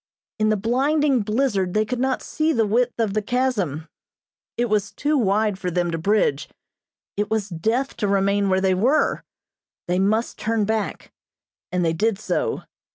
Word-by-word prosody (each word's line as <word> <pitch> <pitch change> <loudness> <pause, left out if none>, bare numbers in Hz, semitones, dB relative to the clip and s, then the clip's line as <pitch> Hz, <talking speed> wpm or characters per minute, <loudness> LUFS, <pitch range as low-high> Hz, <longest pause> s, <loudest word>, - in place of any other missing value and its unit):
In 215 0 +2
the 215 - +2
blinding 270 +5 +2
blizzard 210 -4 0
they 215 0 +3
could 245 +3 -3
not 260 0 0
see 315 +1 0
the 225 -5 +2
width 235 +4 0
of 220 -4 0
the 215 - 0
chasm. 205 - -1 0.7
It 240 - +2
was 210 -3 0
too 300 +1 -1
wide 210 -4 +1
for 180 - -2
them 175 0 0
to 165 - -2
bridge; 165 -6 +1 0.7
it 205 +1 -1
was 215 -2 -1
death 225 +11 -1
to 205 - 0
remain 200 0 +2
where 190 0 +2
they 190 -1 +3
were 245 +11 +2 0.6
they 180 +1 +1
must 215 +4 0
turn 220 -1 0
back, 220 0 -3 0.6
and 180 -1 0
they 165 - +1
did 215 +5 +1
so. 450 - -2
215 Hz, 170 wpm, -22 LUFS, 195-240 Hz, 0.7 s, they